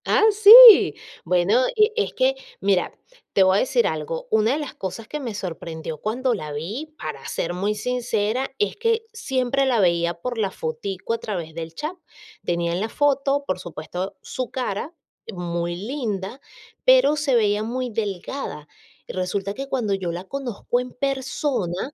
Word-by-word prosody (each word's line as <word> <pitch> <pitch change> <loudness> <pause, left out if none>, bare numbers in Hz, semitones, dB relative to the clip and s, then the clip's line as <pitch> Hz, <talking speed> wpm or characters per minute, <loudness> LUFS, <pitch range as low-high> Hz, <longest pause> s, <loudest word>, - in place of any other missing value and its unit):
Ah, - - +3
sí. 435 +2 +10 0.3
Bueno, 180 +6 +3 0.2
e 425 0 +4
es 430 - -1
que, - - +2 0.3
mira, 195 -2 +1 0.4
te 195 - +5
voy 190 +1 +4
a - - +3
decir 250 -1 +2
algo, 160 +1 -3
una 220 +3 +3
de 295 - -1
las 295 -3 -6
cosas 205 +4 -6
que 300 - -5
me 240 -7 -5
sorprendió 165 -4 -6
cuando 245 - -1
la 155 -8 -5
vi, 225 - -6
para - - -7
ser 175 - -3
muy 200 +4 -1
sincera, 240 +1 -1
es 420 - 0
que 455 -1 0
siempre 270 - 0
la 250 -4 +2
veía 170 -2 +2
por 235 +7 -5
la 205 -3 +1
fotico 185 +5 -4
a 230 - -2
través 175 -7 -5
del 165 0 -7
chat. 310 - -4 0.5
Tenía 170 0 -1
en 175 +2 -2
la 220 - -2
foto, 280 +1 +1
por 185 -5 -2
supuesto, 180 +2 -6
su 255 -2 -4
cara, 250 +2 -3 0.4
muy 175 -2 -3
linda, 215 +1 -4 0.4
pero - - +5
se 290 -3 +1
veía 210 -2 +2
muy 245 +3 -3
delgada, 205 - -4 0.4
y - - -7
resulta 190 +2 -2
que 275 +4 -7
cuando 230 -7 -1
yo 190 -3 -2
la 175 +2 -5
conozco 245 -1 -3
en 250 0 -5
persona 265 - -2
220 Hz, 170 wpm, -23 LUFS, 180-270 Hz, 0.5 s, sí